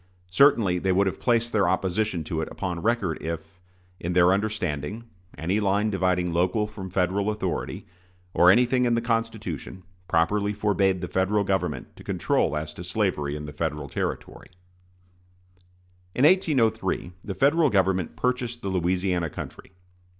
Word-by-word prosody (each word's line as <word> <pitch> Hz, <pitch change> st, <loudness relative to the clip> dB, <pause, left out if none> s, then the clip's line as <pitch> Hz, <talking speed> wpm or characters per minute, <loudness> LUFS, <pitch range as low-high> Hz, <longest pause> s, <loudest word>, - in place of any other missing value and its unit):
Certainly 100 Hz, -6 st, +4 dB
they 95 Hz, +1 st, 0 dB
would 95 Hz, +2 st, +3 dB
have 95 Hz, -, -2 dB
placed 120 Hz, -1 st, +1 dB
their 100 Hz, -5 st, +3 dB
opposition 95 Hz, -1 st, 0 dB
to 80 Hz, 0 st, -3 dB
it -, -, -3 dB
upon 90 Hz, -3 st, -4 dB
record 105 Hz, -7 st, 0 dB
if, 85 Hz, +2 st, -6 dB, 0.4 s
in 90 Hz, +1 st, -3 dB
their 90 Hz, +1 st, +5 dB
understanding, 100 Hz, -2 st, -2 dB, 0.3 s
any 90 Hz, +7 st, 0 dB
line 105 Hz, +1 st, +1 dB
dividing 90 Hz, -2 st, 0 dB
local 90 Hz, +5 st, +1 dB
from 105 Hz, -3 st, -8 dB
Federal 95 Hz, +3 st, 0 dB
authority, 105 Hz, 0 st, -3 dB, 0.5 s
or 90 Hz, -, +6 dB
anything 125 Hz, +5 st, +4 dB
in 120 Hz, -1 st, +2 dB
the -, -, +2 dB
Constitution, 110 Hz, -, -3 dB, 0.2 s
properly 100 Hz, +5 st, +1 dB
forbade 100 Hz, -3 st, +1 dB
the 90 Hz, -, -3 dB
Federal 100 Hz, +3 st, +1 dB
Government 95 Hz, -1 st, -2 dB
to -, -, -12 dB
control 75 Hz, -, 0 dB
as 75 Hz, 0 st, -5 dB
to 85 Hz, -, -8 dB
slavery 90 Hz, -7 st, -1 dB
in 75 Hz, 0 st, -6 dB
Federal 75 Hz, -1 st, -3 dB
territory. -, -, -4 dB, 1.7 s
In 130 Hz, -, +4 dB
1803 115 Hz, -, +2 dB
the 100 Hz, -3 st, -5 dB
Federal 145 Hz, -, +3 dB
Government 95 Hz, -5 st, +1 dB
purchased 125 Hz, -, -2 dB
the 100 Hz, -, -2 dB
Louisiana 90 Hz, -1 st, 0 dB
country. -, -, -9 dB
95 Hz, 145 wpm, -25 LUFS, 90-110 Hz, 1.7 s, or